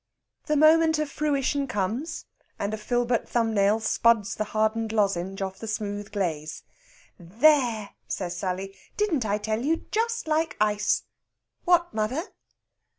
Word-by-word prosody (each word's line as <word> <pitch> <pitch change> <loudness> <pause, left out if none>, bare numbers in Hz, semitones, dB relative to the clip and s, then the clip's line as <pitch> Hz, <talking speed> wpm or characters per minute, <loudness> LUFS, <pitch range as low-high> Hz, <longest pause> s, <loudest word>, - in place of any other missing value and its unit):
The 300 -1 +2
moment 320 +1 +5
of 305 -2 -2
fruition 285 -1 0
comes, 230 - -3 0.3
and 200 +1 -2
a - - -2
filbert 240 +2 0
thumbnail 220 -3 +2
spuds 220 -1 +2
the 215 - -2
hardened 220 +1 0
lozenge 195 -3 0
off 190 0 -5
the 225 - -7
smooth 205 -1 -4
glaze. 160 -7 -3 0.6
"There!" 225 - +2 0.2
says 175 -2 -3
Sally, 190 +2 -4 0.2
"didn't 325 - +1
I 205 +1 +1
tell 215 +1 -2
you? 320 +5 0
Just 460 -2 -1
like 320 +1 0
ice.... 210 0 +1 0.6
What, 345 -1 +3
mother?" 225 +9 -1
220 Hz, 135 wpm, -26 LUFS, 205-295 Hz, 0.6 s, moment